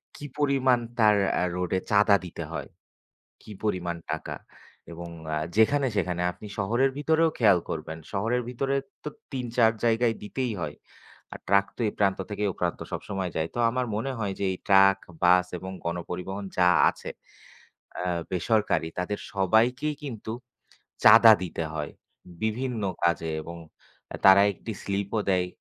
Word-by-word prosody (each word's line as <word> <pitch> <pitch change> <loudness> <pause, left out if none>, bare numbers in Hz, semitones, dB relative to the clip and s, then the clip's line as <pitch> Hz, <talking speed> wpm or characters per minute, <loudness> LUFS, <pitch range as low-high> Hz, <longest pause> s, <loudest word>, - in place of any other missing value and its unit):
কি 145 - -9
পরিমাণ 135 -4 +3 0.2
তার 105 -1 +6 0.3
আ - - +2
রোডে 90 +1 -1
চাঁদা 105 0 +5
দিতে 90 - -7
হয়? - - -5 0.8
কি - - -14
পরিমাণ 90 -5 -1 0.2
টাকা? - - -4 0.6
এবং 85 +1 -8 0.3
আ - - -1 0.2
যেখানে-সেখানে। 110 -8 +2
আপনি 90 +5 -12
শহরের 120 +7 +2
ভিতরেও 160 +2 +2
খেয়াল 105 -6 +5
করবেন। 80 0 -5
শহরের 115 +5 0
ভিতরে 135 +2 -1 0.3
তো - - -2 0.2
৩-৪ 120 -3 +2
জায়গায় 115 0 +2
দিতেই 125 +3 -3
হয়। 75 -3 -4 0.6
আর - - -7
ট্রাক 100 0 +4
তো - - -11
এই - - -4
প্রান্ত 100 -2 +2
থেকে 105 0 -2
ও - - -6
প্রান্ত - - -1
সবসময় 95 -3 -4
যায়। 80 +1 -1
তো - - -5
আমার 125 +1 -1
মনে 125 +6 -2
হয় 100 -3 -2
যে - - 0
এই 90 - -6
ট্রাক, 95 0 +6 0.2
বাস 90 0 +5
এবং 95 +2 -7 0.2
গণপরিবহন 90 +3 -4
যা 90 -1 +5 0.2
আছে - - -9 0.9
অ্যা 90 0 -2 0.2
বেসরকারি, 95 -2 +1
তাদের 95 +3 -2 0.2
সবাইকেই 120 +10 +2
কিন্তু 110 -5 -6 0.7
চাঁদা 115 +1 +9
দিতে 85 -1 -4
হয় 75 -2 -4 0.5
বিভিন্ন 115 +1 -2 0.2
কাজে 85 -1 +1
এবং 85 +1 -8 0.6
আ - - -2
তারা 95 0 +9
একটি 110 - -8
স্লিপও 100 +2 -2
দেয়। 90 -1 +1
105 Hz, 150 wpm, -26 LUFS, 90-120 Hz, 0.9 s, চাঁদা